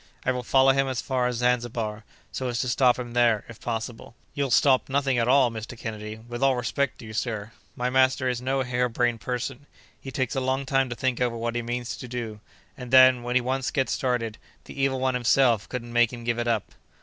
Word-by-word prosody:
I 125 - +3
will 125 0 -2
follow 135 +2 +4
him 135 0 +1
as 130 -2 -2
far 130 -2 0
as 125 - -2
Zanzibar, 120 -3 -1 0.3
so 130 - -3
as 120 -1 -2
to 125 - -2
stop 125 0 +3
him 120 -2 -6
there, 120 -3 +3
if 115 -2 -12
possible." 115 0 -5 0.2
"You'll 140 -1 -1
stop 130 +2 +3
nothing 135 -2 +1
at 115 - +1
all, 130 -1 +4
Mr. 115 +2 -7
Kennedy, 110 -2 -6
with 120 +2 -8
all 135 -1 +4
respect 130 +2 -1
to - - -11
you, 110 - -9
sir. 110 -2 -3 0.2
My 125 +1 -1
master 130 0 +3
is 125 -1 -1
no 135 +1 0
hare 125 0 0
brained 120 -1 0
person; 125 +5 -4 0.3
he 135 - -7
takes 130 0 -2
a 135 - 0
long 130 +1 -1
time 135 -1 +1
to 120 - -4
think 130 0 -1
over 120 -2 0
what 115 +1 -2
he 120 - -1
means 120 +1 -4
to 125 - -8
do, 115 -3 -5 0.4
and 125 -2 -8
then, 130 -1 +7
when 120 +1 -3
he 130 - +5
once 130 +1 -1
gets 135 -2 0
started, 120 -4 -1 0.3
the 140 - -6
Evil 135 -1 +1
One 130 0 +1
himself 120 -2 +2
couldn't 120 -2 -6
make 120 -1 +4
him 120 -2 -8
give 120 0 -1
it 120 - -1
up." 115 -3 -1
125 Hz, 235 wpm, -26 LUFS, 120-130 Hz, 0.4 s, then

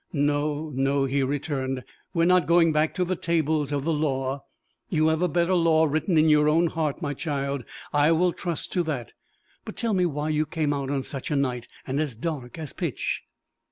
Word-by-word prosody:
"No, 145 +1 0
no," 135 +1 +1
he 135 +1 0
returned; 135 -1 -2 0.3
"we 165 - +1
are - - +5
not 180 -3 +4
going 170 -1 +5
back 155 +1 +1
to 180 - +1
the 185 +1 -1
tables 160 -4 0
of 140 -2 -1
the 165 - +1
law! 135 -2 -1 0.5
You 160 -4 +3
have 160 +1 +1
a 180 - +3
better 175 +2 +1
law 165 -2 +4
written 155 +3 +1
in 155 +1 +5
your 150 +2 +4
heart, 155 0 -2
my 145 -1 -1
child; 140 -3 -2 0.3
I 145 +2 +4
will 175 +2 +3
trust 170 -4 -4
to 180 - +2
that. 135 -8 -4 0.5
But - - -8
tell 230 -2 -1
me 180 -2 +3
why 150 -1 -2
you 155 0 +1
came 155 -2 0
out 140 -2 -3
on 140 -1 -1
such 135 -1 -4
a 150 - 0
night 125 -4 -1 0.2
and 135 +2 -2
as 150 -6 -1
dark 135 0 -5
as 155 -4 -6
pitch." - - -2
150 Hz, 205 wpm, -26 LUFS, 140-165 Hz, 0.5 s, are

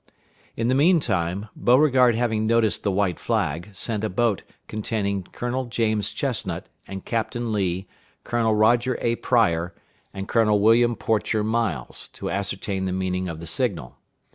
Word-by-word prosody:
In 115 - 0
the 125 - +2
mean 165 +6 +5
time, 95 - -2
Beauregard 130 -2 +4
having 110 -2 0
noticed 115 -2 +2
the 100 - 0
white 95 -3 0
flag, 85 +7 -1
sent 105 +2 -2
a 110 - 0
boat 110 +1 +1 0.3
containing 105 -2 -2
Colonel 125 +5 -3
James 110 -3 0
Chestnut, - - -2 0.2
and 95 -1 -7
Captain 115 0 -2
Lee, 95 -2 -1 0.4
Colonel 115 -2 +1
Roger 120 +3 +3
A. 115 0 0
Pryor, 85 -8 +1 0.4
and 95 0 -6
Colonel 105 -3 +3
William 115 +3 +4
Porcher 110 -1 0
Miles, 115 +1 -2
to - - -5
ascertain 100 0 -2
the 95 - -1
meaning 95 0 -2
of 80 -1 -6
the 85 - -8
signal. 85 - -2
110 Hz, 150 wpm, -24 LUFS, 95-120 Hz, 0.4 s, mean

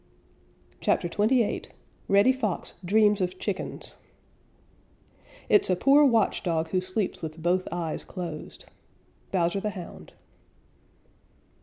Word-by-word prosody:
CHAPTER - - +1
XXVIII 215 +6 +1 0.4
REDDY 200 +6 +5
FOX 220 -8 -3
DREAMS 210 +2 +3
OF 185 0 -2
CHICKENS 190 0 -5 1.5
It's 410 - +4
a 185 - +3
poor 275 +10 +5
watch 230 -6 +2
dog 165 -2 -1
who 185 +2 0
sleeps 185 +2 -3
with 160 -1 -6
both 180 +2 +1
eyes 170 -2 -3
closed. 170 -5 -7 0.7
_Bowser 180 +1 +1
the 210 - -1
Hound. 190 -4 -10
185 Hz, 110 wpm, -27 LUFS, 175-215 Hz, 1.5 s, REDDY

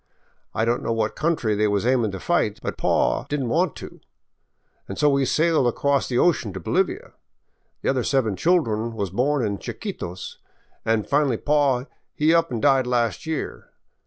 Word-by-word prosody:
I 110 - +1
don't 120 +1 0
know - - -2
what 110 -1 -1
country 155 -9 0
they 105 +1 +2
was 100 +1 0
aimin' 125 -3 +2
to 95 - -5
fight, - - 0
but - - -3
paw - - +1
he - - -15
did 145 -1 -1
n't 125 - -2
want - - +1
to, - - -10 0.9
'n' 95 - -4
so 150 +5 +3
we 140 -1 +2
sailed 155 -2 +2
across 140 +3 +1
the 120 - 0
ocean 130 - +2
to 95 - -5
Bolivia. 80 - -1 0.7
The - - +1
other 130 -2 +1
seven 115 -7 +1
children 115 - +1
was 100 -5 -3
born 130 +4 +1
in 100 -2 -2
Chiquitos, 90 +1 -6 0.5
an' 115 -1 +2
finally 140 -3 +1
paw 140 -3 +2 0.3
he 155 +2 +3
up 165 -3 +2
an' 115 -3 -2
died 135 -3 +3
last 120 - 0
year. 160 -2 -4
125 Hz, 185 wpm, -23 LUFS, 110-145 Hz, 0.9 s, so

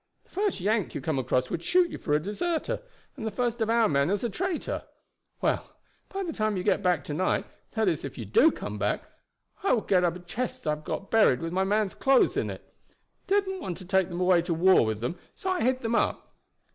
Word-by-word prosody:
The - - -32
first 400 - 0
Yank 210 +2 0
you - - -1
came 155 -5 -1
across 130 0 0
would 165 - -2
shoot 355 - +3
you - - -6
for 150 - -1
a 150 - +4
deserter, 300 - -2 0.3
and 260 - -7
the 220 - -1
first 240 0 -2
of 220 - +1
our 230 -1 +4
men 140 -2 +2
as 200 +3 0
a 235 - -1
traitor. 365 - -2 0.6
Well, - - -1 0.3
by 390 0 -3
the 335 -3 -4
time 215 -2 0
you 180 - -2
get 200 - +2
back 180 -5 +2
to 150 - -5
night, 185 +5 +1 0.3
that 220 -2 +1
is 165 -5 0
if 140 - -6
you 115 - -5
do 235 - +5
come - - -6
back, - - 0 0.6
I 395 - +2
will 230 - +2
get 185 -3 +2
up 175 -1 +1
a - - -7
chest 220 +8 -5
I've 150 0 -1
get 195 - -4
buried 215 - +5
with 165 +3 -4
my 190 +1 +2
men's 205 0 +1
clothes 270 -1 +3
in - - 0
it. - - -10 0.5
They 400 +2 +4
didn't 380 -1 -5
want 180 - -4
to 185 - -11
take 190 0 +2
them 175 0 -4
away 180 -1 +5
to 170 0 -2
the - - -3
war 185 -2 +6
with 110 0 -2
them, 145 +9 -3 0.2
so 375 - -2
I 370 - 0
hid 255 +1 +1
them 230 0 -1
up." - - 0
200 Hz, 245 wpm, -27 LUFS, 170-245 Hz, 0.6 s, war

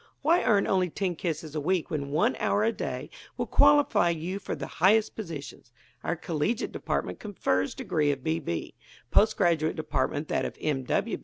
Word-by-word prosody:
Why 335 +5 +4
earn 200 -2 +3
only 185 -2 +1
ten 180 +1 -2
kisses 160 -2 -4
a 155 - -2
week 180 +2 0
when 140 -2 -2
one 150 +4 +2
hour 205 - +1
a 225 - +3
day - - -5 0.3
will - - -1
qualify 285 -10 +4
you 170 +4 -3
for - - -4
the - - -5 0.2
highest 215 +3 +4
positions? 150 - -8 0.3
Our 170 - -1
Collegiate 170 +6 -2
Department - - -3
confers 95 - -1
degree 150 -2 0
of 135 -2 -5
B. 80 +1 0
B.; 85 0 -4 0.4
Post - - +4
Graduate 160 -2 +2
Department 155 -1 -1
that - - 0
of - - -5
M. 135 -4 -2
170 Hz, 175 wpm, -28 LUFS, 150-200 Hz, 0.4 s, Why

